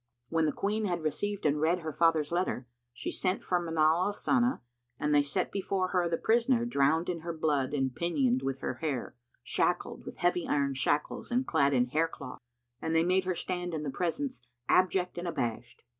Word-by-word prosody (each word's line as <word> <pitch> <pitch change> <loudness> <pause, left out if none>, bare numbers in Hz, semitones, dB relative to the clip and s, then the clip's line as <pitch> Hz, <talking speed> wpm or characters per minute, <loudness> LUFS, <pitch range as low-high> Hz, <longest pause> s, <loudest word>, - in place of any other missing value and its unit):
When 165 -1 +2
the - - +2
Queen 210 +5 -1
had 175 -4 -2
received 200 +6 -2
and 150 0 +2
read 170 +3 +2
her 160 -1 -4
father's 160 -2 +2
letter, 175 -7 -1 0.3
she 120 - -5
sent 185 0 -1
for 180 - +1
Manar 165 0 +2
al 205 - -1
Sana 245 - +1 0.4
and 150 0 +1
they 145 - +6
set 145 0 -1
before 190 -1 -1
her 180 -2 +1
the 165 - 0
prisoner 235 +1 +2
drowned 160 -5 +2
in 175 -2 -2
her 170 +1 -4
blood 150 -5 0
and 135 -3 -1
pinioned 135 -7 +1
with 135 0 -3
her - - -2
hair, 140 -7 -2 0.3
shackled - - 0
with - - -9
heavy 175 0 +1
iron 140 -1 +1
shackles 140 +2 0
and 250 +2 +1
clad 140 - +2
in 125 -1 +4
hair 155 +6 +1
cloth; 140 -5 -9 0.4
and 160 - -1
they 165 - +4
made 185 +2 +2
her 185 -1 0
stand 180 -1 -3
in 155 - -3
the 140 - -3
presence 180 - -3 0.2
abject 185 -1 +2
and 175 - -4
abashed. 120 -6 -3
165 Hz, 200 wpm, -30 LUFS, 145-185 Hz, 0.4 s, they